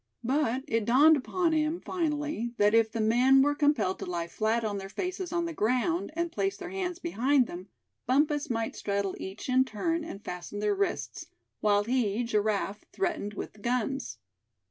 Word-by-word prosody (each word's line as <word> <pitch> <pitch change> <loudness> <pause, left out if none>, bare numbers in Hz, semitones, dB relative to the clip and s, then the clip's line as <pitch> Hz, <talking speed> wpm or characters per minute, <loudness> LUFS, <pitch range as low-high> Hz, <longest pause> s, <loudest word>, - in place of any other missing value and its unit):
But 260 0 0
it 225 -2 0
dawned 285 +7 +6
upon 330 +5 0
him 310 +2 +1
finally 300 -8 -2
that 205 +1 +4
if 225 -1 +4
the 230 - -4
men 250 +5 +5
were 290 +1 +2
compelled 290 -10 +1
to - - -5
lie 170 -1 -2
flat 220 +5 0
on 205 -2 -2
their 195 0 -7
faces 365 - -4
on 345 -1 0
the 335 - -4
ground, 255 - 0
and 340 0 -1
place 390 +3 -1
their 360 -1 -7
hands 365 -2 -3
behind 285 -6 +2
them, 180 -2 -8 0.4
Bumpus 295 +3 +2
might 225 -2 -2
straddle 200 -1 -2
each 190 +3 -7
in 260 0 +4
turn, 330 +8 -2
and 210 -11 -8
fasten 180 +3 -6
their 210 0 +1
wrists, 145 - -2 0.3
while 205 -1 +3
he, 235 -1 0
Giraffe 210 -2 -1
threatened 345 - -2
with - - -6
the 210 - -19
guns. 245 - -2
245 Hz, 180 wpm, -29 LUFS, 210-310 Hz, 0.4 s, dawned